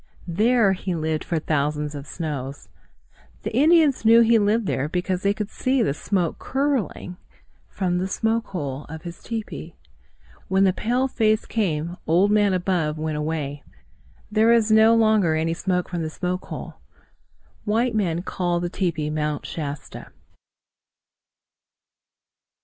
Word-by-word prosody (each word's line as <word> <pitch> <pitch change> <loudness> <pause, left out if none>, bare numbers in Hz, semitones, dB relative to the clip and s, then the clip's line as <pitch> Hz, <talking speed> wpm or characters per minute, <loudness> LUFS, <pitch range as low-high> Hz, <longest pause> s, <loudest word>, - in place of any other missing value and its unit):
There 215 +3 +3
he 185 -1 -3
lived 155 -1 -1
for 170 - -2
thousands 150 -1 -1
of 140 -1 -7
snows. 140 -5 -5 0.7
The - - -4
Indians 310 -3 +4
knew 230 +1 +7
he 230 0 +5
lived 215 +2 +2
there 145 -4 -1
because 180 +1 -1
they 200 - +2
could 210 0 -4
see 260 -1 +1
the 140 - 0
smoke 175 +2 -1
curling 265 -10 -2 0.5
from 180 -2 -1
the 185 - -1
smoke 225 +4 -1
hole 145 -6 -5
of 160 +2 -9
his 170 -1 -8
tepee. 225 -2 -6 0.7
When 190 +1 +3
the 190 -1 +4
pale 245 +7 0
face 220 -4 +1
came, 175 -5 -2
Old 185 +6 +3
Man 205 -1 +4
Above 175 -4 0
went 155 -1 -2
away. 150 -2 -3 0.7
There 220 +2 +4
is 225 -2 +3
no 220 +1 +6
longer 215 -7 +3
any 160 +1 0
smoke 180 +1 -1
from 175 -2 -3
the 160 - -2
smoke 180 +3 -3
hole. - - -8 0.9
White 230 +3 +1
men 175 -5 0
call 175 -2 -1
the 175 0 -3
tepee 165 -6 -1
Mount 150 -1 -2
Shasta. 145 -2 -6
180 Hz, 145 wpm, -23 LUFS, 160-220 Hz, 0.9 s, knew